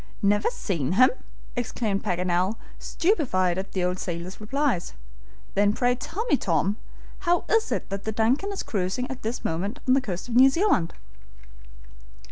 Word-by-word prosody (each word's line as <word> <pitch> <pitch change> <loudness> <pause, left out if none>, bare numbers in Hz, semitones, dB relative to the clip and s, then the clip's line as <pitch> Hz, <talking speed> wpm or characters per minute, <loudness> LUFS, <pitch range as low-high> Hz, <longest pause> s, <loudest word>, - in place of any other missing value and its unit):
"Never 205 +1 +3
seen 175 - -2
him!" 255 +6 +6 0.4
exclaimed 225 -4 -1
Paganel, 180 +1 0 0.2
stupefied 190 - +1
at 195 - -6
the 185 - 0
old 180 +1 0
sailor's 175 +3 -5
replies. 265 -4 0 0.6
"Then 205 +1 +3
pray 245 +2 +2
tell 350 - -4
me, 435 - +3
Tom, 190 +3 +1 0.4
how 350 -2 +1
it - - -6
is 445 0 +3
that - - -2
the 220 - -2
DUNCAN 245 - +1
is 395 - -4
cruising 195 +5 -2
at 260 - -7
this 225 +3 -4
moment 195 - -2
on 255 - +5
the 270 - +4
coast 190 -4 -5
of 235 - -4
New 260 +2 +8
Zealand?" 300 - +1
215 Hz, 160 wpm, -26 LUFS, 185-265 Hz, 0.6 s, New